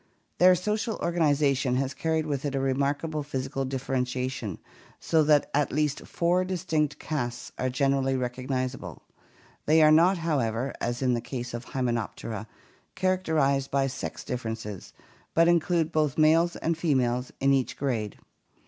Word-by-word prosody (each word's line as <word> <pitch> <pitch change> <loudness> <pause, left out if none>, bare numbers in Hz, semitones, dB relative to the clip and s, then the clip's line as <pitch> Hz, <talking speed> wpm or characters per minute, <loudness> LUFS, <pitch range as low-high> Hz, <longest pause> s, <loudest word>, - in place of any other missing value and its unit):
Their 180 +1 +7
social 210 +4 -1
organization 145 -6 +1
has 135 +1 -1
carried 160 -1 -1
with 140 -3 -2
it 140 -2 -2
a - - +1
remarkable 140 +4 -1
physi 135 -1 -4
cal 135 -1 -1
differentiation 125 -4 -2 0.4
so 160 - +2
that 150 -1 +3
at 145 0 +1
least 150 -1 -1
four 175 +2 +1
distinct 160 -5 -1
castes 120 -6 -4
are 130 - 0
generally 135 0 +1
recognizable; 130 +1 -4 0.6
they 155 +2 +5
are 155 - +7
not, 175 +5 +5
however, 135 -7 -1
as 120 +2 -2
in 125 -1 +3
the 120 - -1
case 120 0 -6
of 120 0 -6
the - - -14
Hymenop 120 -5 -1
tera, 110 -1 -6 0.5
characterized 160 -8 +1
by 135 0 +1
sex 135 0 -5
differences 110 -5 -5 0.4
but 165 +1 +5
include 170 -1 +2
both 150 -4 +1
males 165 +2 +4
and 165 +1 -1
females 125 -6 +1
in 135 0 +3
each 135 -2 0
grade. 115 -7 -2
140 Hz, 150 wpm, -27 LUFS, 125-160 Hz, 0.6 s, Their